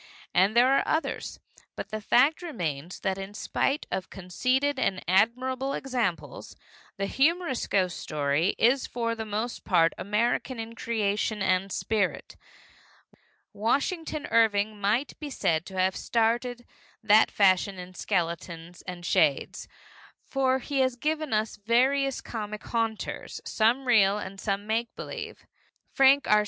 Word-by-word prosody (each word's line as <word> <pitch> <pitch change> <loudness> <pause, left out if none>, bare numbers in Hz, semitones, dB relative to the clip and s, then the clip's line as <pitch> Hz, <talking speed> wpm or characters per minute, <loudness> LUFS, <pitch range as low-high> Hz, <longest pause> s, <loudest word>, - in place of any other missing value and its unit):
And 195 +5 +3
there 255 +3 +6
are - - +1
others. 320 - -2 0.4
But - - -6
the 215 0 -4
fact 265 +10 +3
remains 175 - -4
that 190 -1 -1
in 195 +1 -7
spite 280 +7 -1
of 190 - -3
conceded 255 +10 -1
and 185 -6 -1
admirable 255 +8 +1
examples, 205 - -3 0.4
the 195 - -1
humorous 300 - +1
ghost 185 -3 0
story 150 +4 0
is 255 +4 +3
for 230 -1 -2
the 220 -1 -5
most 215 +3 -3
part 165 -3 +3
American 230 +4 -1
in 225 +1 -6
creation 210 -2 -1
and 190 +1 +1
spirit. 205 -2 -1 1.2
Washington 295 - -1
Irving 215 -2 +2
might 220 +8 0
be 300 - -6
said 165 - 0
to 190 - -8
have 185 0 +2
started 240 +1 0 0.4
that 220 0 +5
fashion 195 0 +3
in 180 0 -9
skeletons 170 -2 -3
and 175 -1 -7
shades, 150 -4 +1 0.6
for 265 -1 +1
he 275 +1 -3
has 260 -1 +2
given 305 +3 -2
us 215 0 0
various 260 +5 +2
comic 215 -2 -6
haunters, 225 -2 -3
some 235 +5 +1
real 210 -5 +4
and 195 -1 -7
some 200 -1 -2
make 225 +2 -2
believe. 450 -2 -7 0.5
Frank 275 +1 +5
R. 210 - +5
220 Hz, 135 wpm, -27 LUFS, 190-260 Hz, 1.2 s, there